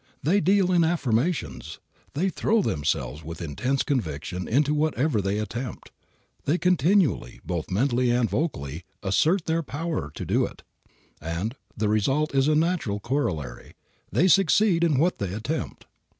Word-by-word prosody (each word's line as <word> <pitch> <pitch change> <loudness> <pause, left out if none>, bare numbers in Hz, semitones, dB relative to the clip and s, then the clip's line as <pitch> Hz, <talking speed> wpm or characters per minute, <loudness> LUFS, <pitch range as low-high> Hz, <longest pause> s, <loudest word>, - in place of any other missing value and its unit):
They 175 +9 +3
deal 190 +1 +3
in 175 -2 +4
affirmations. 160 -1 -1 0.4
They 185 +7 +1
throw 215 +3 +1
themselves 75 - -1
with 80 +1 -7
intense 125 - -1
conviction 90 - -3
into 145 +5 +2
whatever 150 -5 +1
they 100 +1 -1
attempt. 115 +3 -5 0.5
They 155 +5 +2
continually, 180 - +2
both 85 -3 -3
mentally 125 +5 +1
and 120 -1 +2
vocally, 85 - -3 0.2
assert 160 - +2
their 165 +1 +1
power 160 +2 -3
to - - -5
do - - +2
it, - - -6 0.6
and 85 - -3 0.2
the 110 0 0
result 135 +9 +1
is 135 0 +3
a 155 - +3
natural 155 - 0
corollary; 90 - -3 0.4
they 180 - +3
succeed 190 -1 +4
in 155 -5 +3
what 170 +6 +2
they 100 -1 -3
attempt. 140 +9 -4
135 Hz, 145 wpm, -25 LUFS, 100-165 Hz, 0.6 s, in